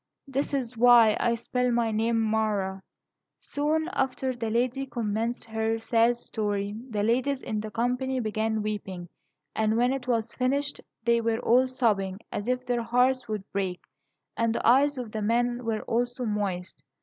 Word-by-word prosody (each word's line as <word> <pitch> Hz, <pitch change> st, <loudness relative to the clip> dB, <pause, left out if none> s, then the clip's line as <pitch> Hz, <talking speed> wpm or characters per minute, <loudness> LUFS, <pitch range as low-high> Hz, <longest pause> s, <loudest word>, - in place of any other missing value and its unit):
This 275 Hz, +1 st, -1 dB
is 255 Hz, -4 st, -2 dB
why 230 Hz, -2 st, +7 dB
I 235 Hz, 0 st, +2 dB
spell 250 Hz, +2 st, -1 dB
my 235 Hz, -2 st, +1 dB
name 225 Hz, +1 st, +1 dB
Mara." 215 Hz, -3 st, 0 dB, 0.6 s
Soon 310 Hz, +3 st, -1 dB
after 265 Hz, -2 st, -1 dB
the 230 Hz, -2 st, -3 dB
lady 250 Hz, +4 st, 0 dB
commenced 230 Hz, -1 st, -2 dB
her 225 Hz, 0 st, -1 dB
sad 230 Hz, +1 st, +2 dB
story, 205 Hz, -3 st, -2 dB, 0.2 s
the 210 Hz, -3 st, -1 dB
ladies 255 Hz, +5 st, +1 dB
in 215 Hz, -, -2 dB
the 215 Hz, +1 st, -5 dB
company 250 Hz, +4 st, -1 dB
began 220 Hz, -1 st, -1 dB
weeping; 190 Hz, -4 st, -5 dB, 0.5 s
and 220 Hz, 0 st, +1 dB
when 245 Hz, +2 st, +3 dB
it 260 Hz, -2 st, -5 dB
was 230 Hz, -2 st, 0 dB
finished, 280 Hz, +3 st, -1 dB, 0.2 s
they 235 Hz, 0 st, +3 dB
were 225 Hz, 0 st, +1 dB
all 255 Hz, +3 st, +4 dB
sobbing 205 Hz, -7 st, 0 dB
as 205 Hz, -, -4 dB
if 250 Hz, 0 st, -1 dB
their 245 Hz, -1 st, 0 dB
hearts 250 Hz, +2 st, +2 dB
would 215 Hz, -3 st, -3 dB
break; 190 Hz, -3 st, -2 dB, 0.6 s
and 230 Hz, 0 st, +1 dB
the -, -, 0 dB
eyes 275 Hz, +4 st, +5 dB
of 240 Hz, -4 st, -5 dB
the 215 Hz, -, -3 dB
men 240 Hz, +3 st, +1 dB, 0.2 s
also 245 Hz, +2 st, -1 dB
were 230 Hz, -, -1 dB
moist. 190 Hz, -7 st, -3 dB
230 Hz, 165 wpm, -27 LUFS, 215-250 Hz, 0.6 s, why